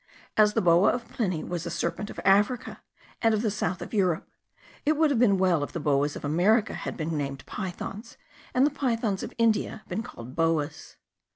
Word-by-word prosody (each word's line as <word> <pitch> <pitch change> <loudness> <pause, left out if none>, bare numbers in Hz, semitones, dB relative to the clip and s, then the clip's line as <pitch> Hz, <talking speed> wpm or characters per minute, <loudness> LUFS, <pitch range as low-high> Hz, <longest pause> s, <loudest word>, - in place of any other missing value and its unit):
As 210 -1 +4
the 225 - +2
boa 175 +2 +5
of 240 -1 -4
Pliny 185 -9 -2
was 175 -1 -4
a - - -2
serpent 170 +5 -3
of - - -8
Africa 205 +5 +2 0.4
and 225 -1 +4
of 215 - -1
the 215 - +1
south 180 -4 -2
of - - -10
Europe, 185 -6 +1 0.6
it 305 +1 +2
would 315 -1 +4
have 255 - +1
been 210 -5 +4
well 180 -5 +2
if - - -6
the 170 - -3
boas 145 -1 +1
of - - -6
America 190 +9 +3
had - - -5
been 160 0 -2
named 140 -2 -4
pythons, 200 +3 -6 0.3
and 255 +2 +4
the 295 - +2
pythons 230 -8 -1
of - - -5
India 225 -1 +1
been 185 +5 -2
called 125 - -10
boas. 165 -2 -1
195 Hz, 200 wpm, -27 LUFS, 165-225 Hz, 0.6 s, boa